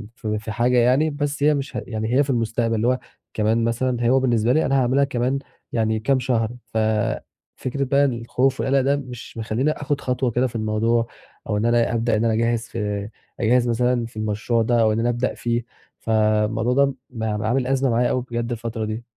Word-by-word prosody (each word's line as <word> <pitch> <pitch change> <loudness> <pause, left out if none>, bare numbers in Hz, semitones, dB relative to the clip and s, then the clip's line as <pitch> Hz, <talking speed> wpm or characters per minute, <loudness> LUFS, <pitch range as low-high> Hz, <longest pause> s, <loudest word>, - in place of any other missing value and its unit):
في 105 -3 -3
في 110 0 -6
حاجة 120 +3 +2
يعني 130 +6 +4
بس 145 -1 -3
هي 150 +1 +5
مش 140 -1 -4
يعني 110 0 -3
هي 145 - +5
في 140 - -7
المستقبل 115 -1 0
اللي 115 +2 +1
هو 130 0 +2 0.3
كمان 110 +2 +1
مثلًا 120 +1 0
هو 135 - +4
بالنسبة 120 -2 +2
لي 155 - +2
أنا 135 0 +2
هاعملها 130 +3 +3
كمان 130 0 0 0.3
يعني 110 -1 0
كام 130 +4 +1
شهر، 120 -3 0 0.2
ففكرة 110 +4 -2
بقى 140 +1 +3
الخوف 125 +1 0
والقلق 135 0 +2
ده 140 +2 +2
مش 125 -4 -8
مخليني 115 +6 0
آخد 145 -1 -2
خطوة 125 -1 0
كده 125 +3 +1
في 120 - -11
الموضوع 115 +2 +1 0.4
أو 105 - +1
إن 105 - 0
أنا 120 -1 +2
أبدأ 115 -1 +1
أنا 115 0 +1
أجهز 115 +1 +1
في 105 -2 -3 0.3
أجهز 120 +2 +3
مثلًا 120 0 +1
في 115 -1 -12
المشروع 110 +2 0
ده 115 +1 +2
أو 110 -1 +3
إن 110 - -1
أنا 120 +1 +1
أبدأ 120 +1 -1
فيه، 120 0 -2 0.4
فالموضوع 110 +2 +1
ده 140 0 +3 0.2
ب 115 -3 -6
عامل 110 +4 0
أزمة 135 0 +1
معايا 120 +1 +2
أوي 125 - 0
بجد 120 0 -2
الفترة 115 -1 -3
دي. 110 +2 -4
120 Hz, 195 wpm, -22 LUFS, 110-130 Hz, 0.4 s, هي